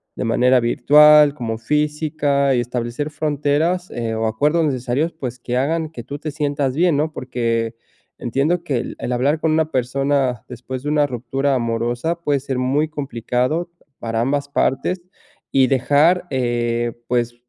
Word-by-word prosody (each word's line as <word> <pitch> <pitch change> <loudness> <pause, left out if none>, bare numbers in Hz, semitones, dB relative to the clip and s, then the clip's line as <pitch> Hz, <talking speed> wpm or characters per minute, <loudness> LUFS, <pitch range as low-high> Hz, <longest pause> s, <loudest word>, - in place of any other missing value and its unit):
de - - -3
manera 125 +2 +3
virtual 150 +5 +6
como 115 -4 -4
física 150 +1 0
y 120 - +2
establecer 120 +4 -3
fronteras, 150 +4 0
eh, 115 -2 -3
o 110 0 -1
acuerdos 150 +9 +1
necesarios, 135 +3 -1
pues, 125 -6 -6
que 120 +1 -4
hagan 160 +4 0
que 120 -7 -8
tú 140 +4 -7
te 155 0 -5
sientas 145 -3 -1
bien, 170 -2 +3
¿no? 155 +1 -1
Porque 115 -3 -2 0.4
entiendo 145 +9 0
que 145 -7 -1
el 120 - -4
el 125 - -3
hablar 140 +6 +1
con 160 - +1
una 160 0 +1
persona 130 -1 0
después 125 +1 -6
de 145 - -2
una 150 -1 +3
ruptura 135 +2 -1
amorosa 120 +6 -1
puede 145 -3 +1
ser 135 -1 -3
muy 140 +5 +1
complicado 140 +3 -2 0.3
para 115 0 -2
ambas 140 +3 0
partes 140 +7 0 0.5
y 135 -1 +4
dejar, 145 +8 +3
eh, 120 -2 -1
pues, 120 -1 0
135 Hz, 160 wpm, -20 LUFS, 120-150 Hz, 0.5 s, virtual